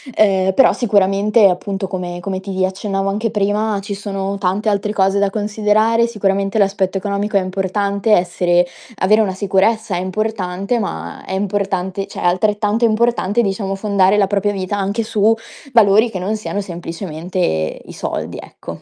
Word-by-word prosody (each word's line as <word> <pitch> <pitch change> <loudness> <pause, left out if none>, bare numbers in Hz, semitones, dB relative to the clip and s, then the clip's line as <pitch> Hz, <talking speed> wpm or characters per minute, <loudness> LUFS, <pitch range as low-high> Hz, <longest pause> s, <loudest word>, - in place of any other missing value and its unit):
ehm, 190 -2 +3
però 270 - +5
sicuramente, 205 0 +3
appunto, 195 +2 -2
come 180 -2 -5
come 190 +1 -3
ti 190 -1 -1
accennavo 195 +1 -2
anche 215 +3 -1
prima, 210 0 0
ci 200 +1 -5
sono 195 -1 -4
tante 195 +3 0
altre 205 0 0
cose 195 0 +2
da 200 0 +2
considerare: 215 +2 +1
sicuramente 200 -2 -1
l'aspetto 195 -2 +1
economico 200 +1 -1
è - - +3
importante, 200 +2 -1
essere 175 -2 +3 0.3
avere 215 +4 +4
una 195 -3 0
sicurezza 200 +2 +1
è - - -1
importante, 200 +2 -2
ma 205 - -5
è - - -5
importante 195 -1 -2
cioè, - - -8
è - - -2
altrettanto 210 +5 +2
importante, 230 -1 +2
diciamo, 195 -2 -2
fondare 200 -1 +2
la 200 -2 +3
propria 205 +1 0
vita 195 +1 -3
anche 200 +3 -1
su 220 0 +2 0.4
valori 220 0 +5
che 190 - -5
non 200 +4 -1
siano 205 -1 -3
semplicemente 170 - -3
i - - -11
soldi, - - -4
ecco. - - -10
200 Hz, 160 wpm, -18 LUFS, 190-210 Hz, 0.4 s, però